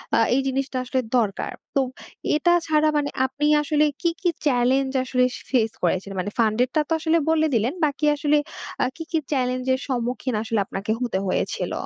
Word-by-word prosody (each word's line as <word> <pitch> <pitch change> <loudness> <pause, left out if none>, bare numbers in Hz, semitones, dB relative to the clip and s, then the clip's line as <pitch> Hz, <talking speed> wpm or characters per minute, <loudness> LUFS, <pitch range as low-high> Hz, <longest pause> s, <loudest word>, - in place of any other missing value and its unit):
আ - - +4 0.2
এই 270 - +3
জিনিসটা 270 0 -1
আসলে 260 +1 -1 0.2
দরকার। 210 -5 -1 0.2
তো 275 - +4 0.5
এটা 345 +3 +3 0.2
ছাড়া 310 0 +3
মানে 290 -1 0 0.2
আপনি 285 +3 -2 0.2
আসলে 300 +1 +2 0.2
কি, 340 - +2
কি 360 - +2 0.2
চেলেঞ্জ 265 0 +2
আসলে 255 -1 +1 0.3
ফেস 225 -4 +2
করেছিলেন? 185 +3 0
মানে 205 - -4
ফান্ডেরটা 240 +6 +2
তো - - -18
আসলে 320 +1 +2
বলে 320 -1 +3
দিলেন। 230 +5 +1
বাকি 295 +1 -1
আসলে 295 0 +2 0.5
আ - - +3
কি, 325 - -6
কি 330 - +2
চেলেঞ্জের 255 -1 0
সম্মুখীন 250 -1 -2
আসলে 225 -1 -1
আপনাকে 195 +2 -4
হতে 235 -6 -1
হয়েছিল? 185 - -1
260 Hz, 170 wpm, -23 LUFS, 235-295 Hz, 0.5 s, আ